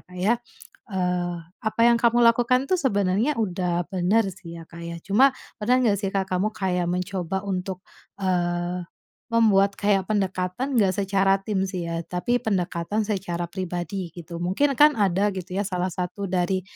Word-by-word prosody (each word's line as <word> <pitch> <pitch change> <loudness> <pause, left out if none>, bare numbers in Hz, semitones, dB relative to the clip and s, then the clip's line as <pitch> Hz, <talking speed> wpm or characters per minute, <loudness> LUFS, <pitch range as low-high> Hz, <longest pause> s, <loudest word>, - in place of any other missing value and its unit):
Kak 180 - -10
ya. 210 +6 +3 0.6
Eee, 180 -2 -1 0.3
apa 220 +1 -2
yang 235 -1 +5
kamu 235 0 +4
lakukan 245 +3 +4
tuh 370 - +2
sebenarnya 210 +2 +1
udah 180 -4 -1
benar 195 +4 +2
sih 170 -2 -10
ya 165 - -11
Kak 170 0 -11
ya. 170 0 -5
Cuma 255 +8 +5 0.3
pernah 250 +4 +3
nggak 200 -2 +2
sih 195 - 0
Kak 195 -1 -1
kamu 195 +4 +1
kayak 180 -4 -1
mencoba 185 +1 -2
untuk, 185 -1 -3 0.4
eee, 175 -1 -1 0.5
membuat 200 -4 +4
kayak 200 -2 +1
pendekatan 200 +5 -1
enggak 190 -3 +3
secara 195 0 +2
tim 195 -2 -1
sih 185 -2 -4
ya, 165 - -2
tapi 240 +8 0
pendekatan 190 0 -1
secara 175 -5 -3
pribadi, 180 0 -4
gitu. 170 -1 -8
Mungkin 235 +10 +1
kan 295 0 +7
ada 200 -1 +1
gitu 185 0 -6
ya 200 - 0
salah 180 -1 -1
satu 180 +2 -4
dari, 185 0 0
190 Hz, 165 wpm, -24 LUFS, 180-210 Hz, 0.6 s, kan